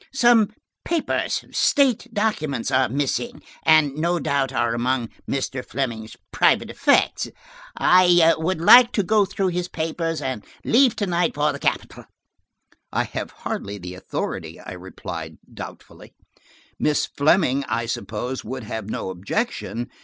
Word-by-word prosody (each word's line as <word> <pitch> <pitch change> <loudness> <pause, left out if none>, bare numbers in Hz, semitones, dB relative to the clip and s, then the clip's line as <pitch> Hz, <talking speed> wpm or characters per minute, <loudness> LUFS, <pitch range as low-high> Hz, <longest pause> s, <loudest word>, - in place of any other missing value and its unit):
Some 240 -5 +5 0.3
papers–state 285 -5 +1
documents–are 140 - 0
missing, 145 - -2 0.2
and 155 -3 +4
no 170 +4 0
doubt 140 -5 0
are 120 -3 0
among 120 0 -1 0.2
Mr. 135 -1 -2
Fleming's 115 -5 -4 0.2
private - - +3
effects. - - +2 0.5
I 175 -2 +5
would 160 +2 -2
like 240 +8 +8
to 205 - +1
go 210 +2 +3
through 195 -1 -1
his 180 0 -2
papers, 165 0 -3
and 130 -6 -4 0.2
leave 245 0 +4
to 205 - -1
night 175 -2 0
for 150 +1 +2
the - - -7
capital." - - -2 0.9
"I - - +1
have - - -5
hardly 100 +1 -5
the 90 -1 -8
authority," 90 - -5
I - - -9
replied - - -8 0.2
doubtfully. - - -11 0.6
"Miss 150 - +1
Fleming, 145 -2 +2
I 115 - -2
suppose, 120 +3 -4
would 130 +2 -6
have 110 -1 -6
no 95 - -3
objection. 120 - -3
155 Hz, 130 wpm, -23 LUFS, 125-185 Hz, 0.9 s, like